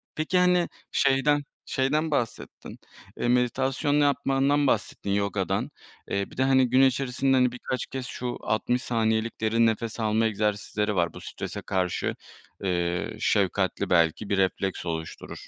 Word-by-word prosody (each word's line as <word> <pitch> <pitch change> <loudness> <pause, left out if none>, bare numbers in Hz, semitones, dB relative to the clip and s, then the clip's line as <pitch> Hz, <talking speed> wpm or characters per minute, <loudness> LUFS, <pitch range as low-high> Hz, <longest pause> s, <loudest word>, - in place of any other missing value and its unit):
peki, 160 +4 0
hani 180 -1 +4 0.2
şeyden 145 +2 +2 0.2
şeyden 150 +4 0
bahsettin, 120 -6 -4 0.4
eee, - - 0
meditasyon 130 +4 +1
yapmandan 140 0 +2
bahsettin, 105 -3 -1
yogadan. 100 -1 -1 0.4
Eee, 100 0 -2
bir - - -14
de, 130 - +2
hani, 130 -1 +4
gün 130 +2 +4
içerisinde, 135 0 +2
hani, 125 -1 +3
birkaç 125 0 -4
kez 130 -2 -5
şu 125 -1 -4
60 120 +3 0
saniyelik 110 -1 -1
derin 115 +1 +3
nefes 115 0 -1
alma 110 0 +2
egzersizleri 105 0 -1
var, 85 -2 +1
bu - - -10
strese - - -6
karşı, 95 -3 -1 0.5
eee, 85 -2 -1
şefkatli 95 -1 +1
belki 85 +3 +2
bir 100 - +1
refleks 95 -1 0
oluşturur. 80 -1 -6
120 Hz, 140 wpm, -26 LUFS, 100-135 Hz, 0.5 s, hani